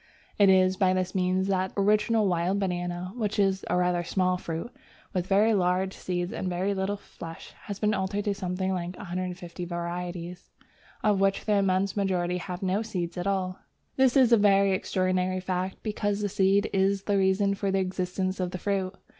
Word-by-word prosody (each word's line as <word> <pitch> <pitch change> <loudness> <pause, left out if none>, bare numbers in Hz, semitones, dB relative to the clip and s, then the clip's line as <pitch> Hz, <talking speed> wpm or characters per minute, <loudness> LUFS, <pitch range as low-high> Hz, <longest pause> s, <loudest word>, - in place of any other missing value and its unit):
It 200 -1 +7
is 185 0 +4
by 185 -1 +3
this 185 0 -1
means 185 0 +1
that 190 -1 0
the 200 - +1
original 210 +1 +3
wild 180 +2 +1
banana, 180 -1 -3
which 215 -3 -2
is 195 -1 +2
a - - +2
rather 180 -1 +1
small 185 +1 +1
fruit 170 +5 -5 0.4
with 180 -2 -1
very 210 +3 +4
large 185 0 +1
seeds 175 0 -3
and 185 - -3
very 185 +3 0
little 195 +1 -1
flesh, 165 -4 -10
has 205 -2 -5
been 210 +1 +1
altered 200 +1 -2
into 205 - +1
something 190 0 -2
like 180 0 -4
150 180 -1 -5
varieties, 175 0 -5 0.5
of 205 -2 +3
which 195 0 +1
the 215 - +2
immense 195 0 +1
majority 180 -3 0
have 180 +1 -6
no 190 +3 +1
seed 180 -6 -4
at 180 +1 -3
all. 185 -2 -1 0.4
This 265 0 +4
is 255 -3 +5
a 235 - +7
very 200 -1 +4
extraordinary 185 0 0
fact, 185 0 -3
because 205 -1 -1
the 205 - -1
seed 195 +1 +3
is 195 0 +2
the 200 -1 +1
reason 195 +1 +2
for 200 0 -2
the 195 - +1
existence 185 0 -2
of 180 -1 -1
the 185 - -5
fruit. 190 0 -2
190 Hz, 190 wpm, -27 LUFS, 180-200 Hz, 0.5 s, It